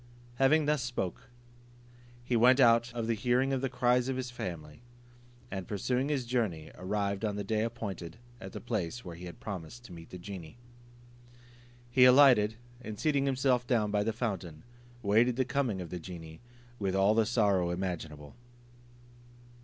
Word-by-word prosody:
Having 145 +4 +4
thus 150 -2 +1
spoken, 120 -8 -3 1.0
he 120 - -1
went 125 +3 +5
out 115 -2 +5
of 115 -1 -2
the 115 - +1
hearing 125 +4 +1
of 130 - 0
the 135 - -1
cries 125 0 +2
of 130 - -1
his 125 -1 -4
family; 85 -6 -7 0.7
and 95 -2 -5
pursuing 125 +7 -1
his 140 -4 -1
journey, 110 -11 -2
arrived 100 +2 -2
on 105 -2 -1
the 100 - -3
day 110 +2 0
appointed 100 -6 -5 0.2
at 95 -3 -8
the - - -6
place 115 -1 -3
where 85 -2 -7
he 90 +2 -9
had 85 - -9
promised 100 +4 -7
to 90 - -11
meet 85 -1 -11
the 90 - -8
genie. 90 +1 -9 1.3
He 125 +1 +6
alighted, 125 -5 +6 0.3
and 110 -4 -7
seating 140 -3 +1
himself 130 -2 +1
down 110 -5 +1
by 105 0 +2
the 115 - 0
fountain, 95 -9 -4 0.4
waited 115 +4 +3
the 130 0 +1
coming 125 -6 -1
of 85 - -8
the 90 - -4
genie, 80 -2 -9 0.4
with 95 -2 -1
all 95 +2 +4
the 110 -1 +2
sorrow 100 -7 +2
imaginable. 85 -5 -4
110 Hz, 170 wpm, -31 LUFS, 95-125 Hz, 1.3 s, He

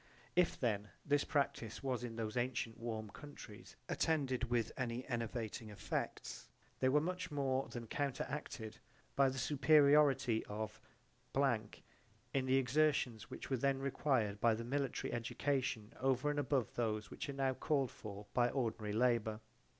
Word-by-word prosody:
If 180 -2 +3
then 105 -4 0 0.2
this 145 0 +3
practise 120 -6 -1
was 130 -3 -1
in 115 -2 -4
those 110 -1 -3
antient 120 -2 -1
warm 110 -2 -4
countries 130 -7 -11
attended 135 -6 +1
with 120 -2 0
any 125 0 -3
enervating 115 -2 -3
effects, 105 0 -4 0.3
they 130 - +4
were 145 +3 +5
much 180 +3 -2
more 135 -2 0
than 120 -1 -5
counteracted 125 -4 -3 0.4
by 135 -1 +5
the 130 - -5
superiority 140 -3 +5
of 110 +1 -5 0.5
[illegible] 120 -6 +1 0.5
in 130 -1 +1
the 130 - +4
exertions 135 -3 +2
which - - -7
were 130 - +3
then 135 +2 +2
required 130 -6 0
by 115 -2 +5
the 115 - -4
military 135 0 -1
education 120 -1 -1
over 135 +2 +2
and 145 - -1
above 135 -5 +1
those 110 -3 -1
which - - -5
are - - -2
now 135 -1 +1
called 135 -1 +1
forth 105 -1 -9
by 120 -1 +4
ordinary 115 -5 -1
labour. 110 -2 +2
125 Hz, 150 wpm, -37 LUFS, 115-140 Hz, 0.5 s, were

